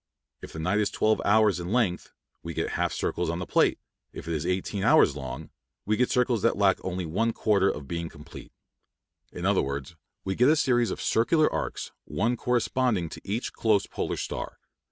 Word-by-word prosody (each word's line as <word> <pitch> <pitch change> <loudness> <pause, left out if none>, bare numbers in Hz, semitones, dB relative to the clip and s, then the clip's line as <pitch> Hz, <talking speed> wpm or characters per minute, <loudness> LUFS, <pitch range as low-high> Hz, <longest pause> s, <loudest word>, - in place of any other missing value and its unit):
If - - -9
the - - -9
night 90 +6 0
is 105 - +1
twelve 110 0 +1
hours 105 -2 +4
in 85 +2 -5
length, 110 -7 0 0.3
we 85 -1 -7
get - - -2
half - - 0
circles 90 -1 -2
on 85 - -2
the 90 - -4
plate; - - +2 0.3
if - - -9
it 85 - -2
is 75 +1 -2
eighteen 95 +2 -2
hours 70 - +5
long, 70 +1 -7 0.3
we 110 - +1
get 125 +2 +1
circles 125 -4 +1
that - - +2
lack 100 -2 +2
only 90 -1 -3
one 110 +8 0
quarter 100 -4 +2
of 75 -2 -5
being 85 +1 -4
complete. 75 +2 -12 0.8
In 90 - -6
other 100 -1 +3
words, 70 +3 -5 0.3
we 95 - -2
get 125 +7 +4
a 155 - +5
series 120 -5 +2
of - - -4
circular 155 +8 +3
arcs, - - -4
one 115 +5 0
corresponding 120 -6 0
to - - -9
each 110 +5 -3
close 105 -3 +2
polar - - -3
star. - - -5
100 Hz, 195 wpm, -27 LUFS, 85-115 Hz, 0.8 s, hours